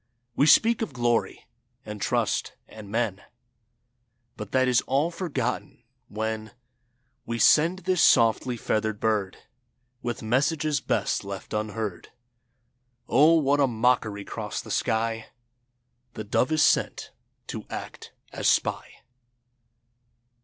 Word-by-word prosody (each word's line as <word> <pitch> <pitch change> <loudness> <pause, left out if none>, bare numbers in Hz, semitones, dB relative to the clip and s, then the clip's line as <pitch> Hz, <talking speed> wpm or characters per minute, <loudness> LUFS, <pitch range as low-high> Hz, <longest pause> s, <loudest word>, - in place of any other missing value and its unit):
We 145 - +3
speak 230 +8 +5
of 190 -11 -3
Glory, 120 -2 -1 0.4
and 105 -1 -7
Trust, - - -1
and 110 -2 -12
Men, 110 -3 -1 1.1
But 105 -2 -8
that 130 -1 +2
is 125 -1 +3
all 140 +6 +1
forgotten 140 -8 -4 0.2
when 110 0 -4 0.7
We 115 - -2
send 170 +9 +4
this 185 -3 +2
softly 120 +1 +3
feathered 110 -1 -1
bird 105 -4 -1 0.6
With 120 -2 -4
messages 140 +5 0
best - - -1
left 100 -1 -8
unheard. 105 -3 -4 1.0
Oh! 150 +7 +5
What 145 -1 +2
a 140 - +4
mockery 110 -4 0
'cross - - -5
the - - -8
sky 115 0 -1 0.9
The 110 - -5
dove 120 +6 0
is 155 -1 +3
sent - - +1 0.4
to - - -6
act - - -8 0.2
as - - -2
spy. - - 0
120 Hz, 115 wpm, -26 LUFS, 110-140 Hz, 1.1 s, speak